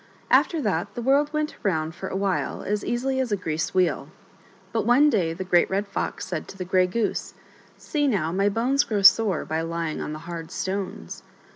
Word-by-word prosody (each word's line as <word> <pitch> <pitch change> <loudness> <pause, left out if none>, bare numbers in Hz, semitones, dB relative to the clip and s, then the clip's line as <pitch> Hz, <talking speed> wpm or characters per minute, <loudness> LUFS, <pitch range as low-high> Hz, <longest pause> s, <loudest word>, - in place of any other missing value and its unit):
After 330 - +4
that 200 -1 -1
the 240 - -4
world 285 +4 +3
went 305 0 -2
around 160 -5 0
for 190 +2 -6
a - - -5
while 195 -1 -1
as 205 +1 -2
easily 260 +2 -1
as 255 -4 -1
a 205 - +2
greased 160 -1 -3
wheel. 185 -1 +1 0.7
But 225 0 0
ope 290 +5 +6
day 180 -8 +1
the 175 +3 -5
Great 175 -2 +3
Red 195 +2 0
Fox 200 - -3
said 170 -4 -4
to 195 - -11
the 185 - -4
Grey 185 0 +3
Goose: 220 +4 -2 0.2
" - - -28
See 290 -2 -1
now, 180 - 0
my 195 +3 +2
bones 255 +7 +2
grow 205 -3 -2
sore 200 -3 +5
by 160 +1 -2
lying 165 -1 -3
on - - -4
the 155 - -5
hard 165 -1 -6
stones." 190 - -4
195 Hz, 210 wpm, -25 LUFS, 170-235 Hz, 0.7 s, ope